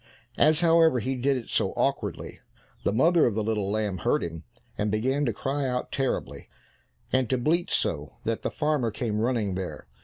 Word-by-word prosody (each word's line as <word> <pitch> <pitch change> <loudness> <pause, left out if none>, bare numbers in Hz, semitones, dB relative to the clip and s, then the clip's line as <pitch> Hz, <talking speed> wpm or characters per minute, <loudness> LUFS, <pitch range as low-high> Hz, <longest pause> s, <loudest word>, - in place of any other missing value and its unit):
As, 155 +1 +5
however, 165 -5 +5
he 130 +4 -2
did 135 +1 +1
it 120 - -7
so - - 0
awkwardly, - - -2 0.4
the - - +1
mother 160 - +4
of 110 - -1
the 110 - 0
little 105 -2 -1
lamb 105 -3 -1
heard - - +1
him, 85 -1 -6 0.3
and 105 0 -1
began 130 +7 0
to 120 - +1
cry 135 +5 -2
out 125 0 -2
terribly, 135 -2 -3 0.6
and 130 -2 +2
to 130 - +2
bleat 165 +8 +1
so 75 -2 -1
that 115 0 -2
the - - -1
farmer 150 -6 0
came 110 -1 -2
running 115 -5 0
there. 95 -1 -5
125 Hz, 185 wpm, -27 LUFS, 105-140 Hz, 0.6 s, As